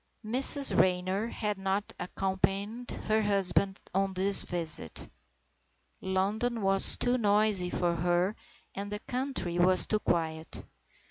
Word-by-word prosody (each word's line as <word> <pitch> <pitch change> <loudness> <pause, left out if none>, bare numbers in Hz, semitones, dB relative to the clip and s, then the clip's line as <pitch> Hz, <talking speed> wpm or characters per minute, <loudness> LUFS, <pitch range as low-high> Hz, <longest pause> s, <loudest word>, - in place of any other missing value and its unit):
II 215 - -8
MRS 275 +3 +7
RAYNOR 185 +3 -1
had 210 -3 -5
not 195 +2 -3
accompanied 195 +5 -4
her 215 0 -2
husband 195 -1 +1
on 195 0 -2
this 195 +2 +4
visit. 165 - -2 0.9
London 205 +5 -3
was 195 0 +5
too 245 +1 -1
noisy 205 -3 +2
for 175 -1 -2
her 175 +4 -1 0.4
and 200 +1 -8
the 210 - -4
country 250 -10 -4
was 185 +1 +3
too 215 - -1
quiet. 160 -4 -3
195 Hz, 125 wpm, -28 LUFS, 180-215 Hz, 0.9 s, MRS